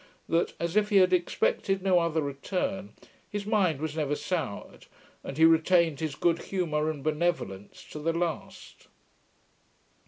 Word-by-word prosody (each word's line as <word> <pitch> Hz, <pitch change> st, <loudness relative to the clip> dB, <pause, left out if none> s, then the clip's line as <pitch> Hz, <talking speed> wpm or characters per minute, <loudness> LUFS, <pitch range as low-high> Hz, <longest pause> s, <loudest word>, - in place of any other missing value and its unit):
POPE.] -, -, -31 dB, 0.2 s
that, -, -, -16 dB
as 170 Hz, +2 st, -2 dB
if 210 Hz, -1 st, +3 dB
he 205 Hz, -, +4 dB
had 185 Hz, -1 st, +5 dB
expected 185 Hz, +2 st, 0 dB
no 185 Hz, -2 st, +4 dB
other 165 Hz, -2 st, 0 dB
return, 185 Hz, +7 st, -3 dB, 0.4 s
his 205 Hz, -1 st, -4 dB
mind 195 Hz, -, +1 dB
was 155 Hz, 0 st, -4 dB
never 150 Hz, -2 st, 0 dB
soured, 150 Hz, -, -4 dB, 0.4 s
and 135 Hz, -, -7 dB
he 160 Hz, -, +6 dB
retained 165 Hz, -1 st, +4 dB
his 155 Hz, -3 st, -3 dB
good 170 Hz, +3 st, +1 dB
humour 155 Hz, -5 st, -1 dB
and 150 Hz, -3 st, -5 dB
benevolence 155 Hz, -, -2 dB
to 150 Hz, -, -6 dB
the 165 Hz, +2 st, 0 dB
last. 170 Hz, 0 st, -5 dB
165 Hz, 155 wpm, -28 LUFS, 150-185 Hz, 0.4 s, he